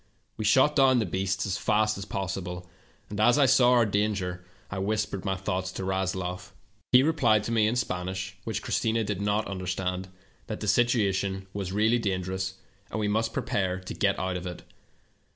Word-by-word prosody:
We 110 - -4
shot 130 +7 +4
down 135 -2 +5
the 115 - +1
beasts 95 +2 -1
as 95 -2 -2
fast 110 0 +2
as 100 - -6
possible, 90 -2 -4 0.4
and 105 - -4
as 120 +5 +5
I 145 - +5
saw 125 -1 +5
our 120 -2 +5
danger 100 -4 -1 0.3
I 100 - -3
whispered 100 -1 -2
my 95 -1 0
thoughts 95 0 -2
to - - -5
Rasloff. 95 -1 -2 0.4
"He 125 +1 +7
replied 140 -9 +3
to 115 - -3
me 110 -2 +3
in 115 - 0
Spanish, 95 -3 -3
which 110 - -3
Christina 115 0 0
did 100 -2 -3
not 105 +1 +1
understand, 95 -1 -3 0.4
that - - -4
the 105 - -4
situation 100 -4 +1
was 100 -2 -4
really 110 +4 +3
dangerous, 95 -2 -2 0.3
and - - -3
we 105 - 0
must 110 +2 0
prepare 95 -4 -1
to 90 - -7
get - - +1
out 95 -1 -2
of 90 +1 -6
it. 90 - -7
100 Hz, 185 wpm, -27 LUFS, 95-110 Hz, 0.4 s, He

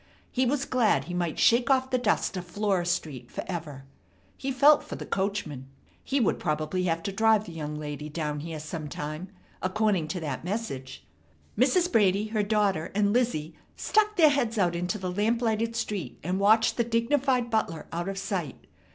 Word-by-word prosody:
He 255 0 +1
was 275 +1 0
glad 245 -4 +2
he 175 - -7
might 175 -3 -1
shake 240 +3 +4
off 260 -1 +2
the 255 - +2
dust 215 -4 +1
of 180 -1 -5
Flora 190 -1 0
Street 150 -9 -3
forever. 150 -7 -6 0.5
He 270 - -3
felt 285 +3 +5
for - - -7
the - - -7
coachman. 190 -9 -2 0.4
He 275 - 0
would 230 - +1
probably 155 +3 -1
have 165 -1 0
to 200 - -2
drive 220 +1 +3
the - - -9
young 150 -2 -5
lady 150 0 -5
down 150 -1 -3
here 160 +1 -6
sometime, 155 +1 -5 0.3
according 190 -3 +1
to 180 - -3
that 145 -4 -4
message. 175 - -5 0.5
Mrs. 360 -1 +3
Brady, 205 0 +3
her 215 -1 0
daughter, 205 -5 +1
and 205 0 +2
Lizzie 225 -11 0 0.2
stuck 425 0 +2
their 325 -6 +7
heads 240 -5 0
out 175 -4 +2
into 180 +5 -2
the 185 -2 -4
lamplighted 225 +2 0
street, 200 - -3
and 180 +4 -1
watched 220 +3 +4
the 235 - +3
dignified 240 +1 +1
butler 165 -8 -1
out 170 +3 -2
of 195 - -4
sight. 180 -8 -4
195 Hz, 175 wpm, -27 LUFS, 165-230 Hz, 0.5 s, their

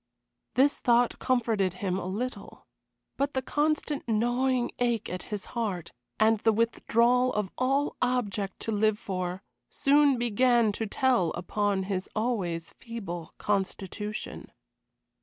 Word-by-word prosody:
This 275 +3 +4
thought 240 0 +3
comforted 225 -7 +1
him 185 0 -2
a 180 - -5
little. 240 +7 -5 0.5
But 280 0 -1
the 260 - 0
constant 300 0 0
gnawing 245 +3 +1
ache 240 -3 +1
at 180 - -4
his 205 -2 -4
heart, 205 -8 -2 0.3
and 220 0 +4
the 225 - +3
withdrawal 235 +2 +2
of 210 -3 -1
all 270 +3 0
object 205 -6 -1
to 225 - -2
live 215 0 +2
for, 185 -2 -4 0.3
soon 285 -1 +4
began 240 -1 +3
to 220 +2 -3
tell 240 -5 +2
upon 195 +2 0
his 190 -1 -3
always 195 -8 -1
feeble 195 -8 -7
constitution. 205 +1 -3
225 Hz, 125 wpm, -28 LUFS, 195-250 Hz, 0.5 s, This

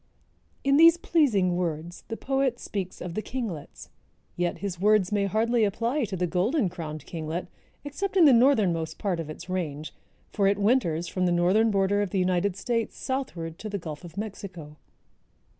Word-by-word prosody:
In 275 +1 +4
these 330 +1 +8
pleasing 225 - +2
words 170 -1 -4
the 225 - -5
poet 270 -2 0
speaks 190 -5 -5
of 180 -1 -5
the 215 - -2
kinglets. 215 - -6 0.5
Yet 175 -1 -1
his 195 -4 -5
words 210 -2 +3
may 200 -1 +1
hardly 225 +3 +2
apply 230 +7 0
to 195 -3 -5
the 180 - 0
Golden 195 - +1
crowned 155 -4 -7
Kinglet, 165 +1 -4 0.4
except 385 +7 -3
in 345 - +7
the 280 - +7
northernmost 195 - +3
part 190 -5 -1
of 160 -2 -5
its 165 +3 -8
range, 155 -5 -4 0.4
for 200 -2 +2
it 200 0 +2
winters 200 -7 +1
from 185 +1 0
the - - +2
northern 185 +6 +3
border 200 0 +2
of 205 - -1
the 195 - -2
United 185 +1 +1
States 230 +2 -2
southward 180 - -4
to 215 - -6
the 200 - -2
Gulf 160 -3 -7
of 175 +1 -11
Mexico. 190 -7 -7
195 Hz, 175 wpm, -27 LUFS, 175-230 Hz, 0.5 s, these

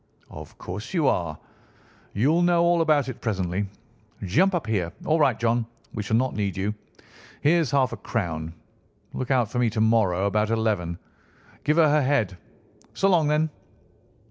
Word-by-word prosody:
"Of - - -11
course 105 - -7
you 160 -4 +2
are. 80 -8 0 0.8
You'll 145 - +2
know 175 -1 +3
all 170 0 +3
about 150 -4 +2
it 130 -1 -7
presently. 95 -2 -1 0.6
Jump 180 - +2
up 170 - -2
here. 95 -7 -1
All 160 +1 +2
right, 130 -6 +3
John; 115 0 +1 0.3
we 110 - -3
shall 110 +2 +1
not 130 +2 0
need 100 -4 -2
you. 100 +2 -1 0.7
Here's 160 -1 +3
half 135 -3 +2
a - - -5
crown. 85 -7 -3 0.6
Look 130 - -4
out 125 -5 +2
for 125 - -1
me 120 -2 +3
to 110 0 -4
morrow, 105 -5 +2
about 105 +1 +1
eleven. 105 -7 -1 0.7
Give 150 +2 +1
her 165 -2 +6
her 150 0 +3
head. 130 -9 +1 0.6
So 195 - +2
long, 170 -5 +3
then!" 150 +1 +1
115 Hz, 170 wpm, -25 LUFS, 100-150 Hz, 0.8 s, her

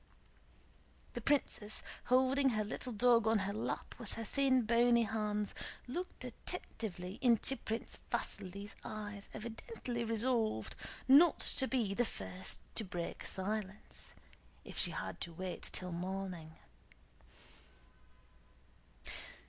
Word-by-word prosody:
The 240 - -3
princess, 215 -5 +1 0.2
holding 260 +2 +5
her 215 -3 +1
little 230 +4 -3
dog 235 0 +5
on 225 0 +5
her 200 - -1
lap 215 - -2
with - - -5
her 225 - -3
thin 260 +1 +3
bony 235 +1 +5
hands, 210 -1 0 0.3
looked 350 +9 -4
attentively 185 -3 -5
into 245 +1 +4
Prince 225 -3 -3
Vasíli's 200 +3 -2
eyes 205 -1 -5
evidently 235 - -4
resolved 225 - +1 0.3
not 295 +5 +8 0.2
to 265 - +5
be 235 -7 +1
the 245 - +3
first 190 -4 -3
to 225 - -1
break 175 -3 -4
silence, 205 +1 -3 0.5
if - - -8
she - - +4
had - - -4
to 170 - -4
wait 185 +1 -4
till 180 -1 -2
morning. 180 -2 -3
220 Hz, 115 wpm, -36 LUFS, 195-245 Hz, 0.5 s, not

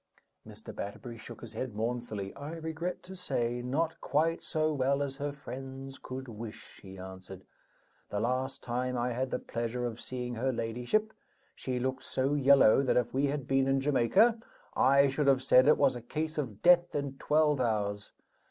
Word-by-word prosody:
Mr. - - -10
Batterbury 115 +3 -6
shook 110 - -10
his 115 -1 -8
head 115 0 -4
mournfully. 110 -3 -3
"I 145 +3 -7
regret 165 +2 -4
to 190 +1 -10
say, 120 -9 -1
not 155 +7 -1
quite 160 +3 +1
so 155 0 0
well 140 0 +1
as 135 -1 -5
her 145 0 -2
friends 135 -1 -8
could 130 +1 -6
wish," 115 -1 -9
he 95 -1 -11
answered. 95 0 -9 0.7
"The 105 - -2
last 130 +4 -1
time 125 +1 -2
I 120 +1 0
had 130 +2 -1
the - - -1
pleasure 120 0 -3
of 115 -1 -5
seeing 125 -1 -4
her 130 +3 0
ladyship, 120 - -1 0.4
she 125 -1 -3
looked 130 +1 -2
so 135 +2 0
yellow 140 -4 +6
that 130 - +2
if 125 - 0
we 140 +2 +2
had 140 -1 -3
been 135 0 +2
in 135 0 +3
Jamaica 145 - +3 0.4
I 140 +1 +5
should 140 +2 0
have 135 -1 +4
said 130 0 +6
it 150 - +6
was 135 -3 +3
a 120 - -6
case 155 +6 -3
of 115 -9 -5
death 175 -1 +5
in 140 -2 -3
twelve 150 -2 +3
hours. 105 -3 -1
130 Hz, 180 wpm, -31 LUFS, 120-145 Hz, 0.7 s, yellow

